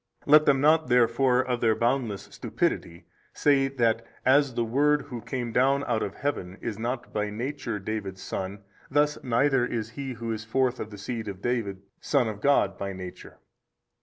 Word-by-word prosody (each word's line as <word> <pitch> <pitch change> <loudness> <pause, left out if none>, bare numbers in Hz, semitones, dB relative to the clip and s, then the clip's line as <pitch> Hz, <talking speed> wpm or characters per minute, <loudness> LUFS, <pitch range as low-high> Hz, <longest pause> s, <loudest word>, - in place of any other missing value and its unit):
Let 150 +1 +6
them 140 -2 +5
not 155 +2 +4
therefore 125 +1 +3
of 125 -2 -2
their 110 -2 +3
boundless 115 -3 0
stupidity 85 0 -2 0.3
say 140 -2 +3
that 115 -4 +1 0.2
as 135 -1 +4
the 120 - 0
Word 145 +5 +2
Who 120 -3 -7
came 120 -2 -4
down 135 +4 +3
out 115 -4 0
of 100 - -3
heaven 95 -10 -3
is 110 -2 -5
not 120 +1 -4
by 105 0 -1
nature 120 +1 -4
David's 100 -2 -5
Son, 95 +1 -5 0.3
thus 145 +1 +1
neither 130 +1 +2
is 115 -2 -3
he 135 +2 -5
who 115 -1 -5
is 110 0 -4
forth 125 +2 0
of 110 - -5
the 105 - -10
seed 110 +2 -5
of 95 -2 -6
David 105 -6 -2 0.2
Son 135 -5 +1
of 105 -1 -5
God 140 -8 +2
by 100 0 -3
Nature. 95 -1 -9
120 Hz, 180 wpm, -27 LUFS, 110-135 Hz, 0.3 s, Let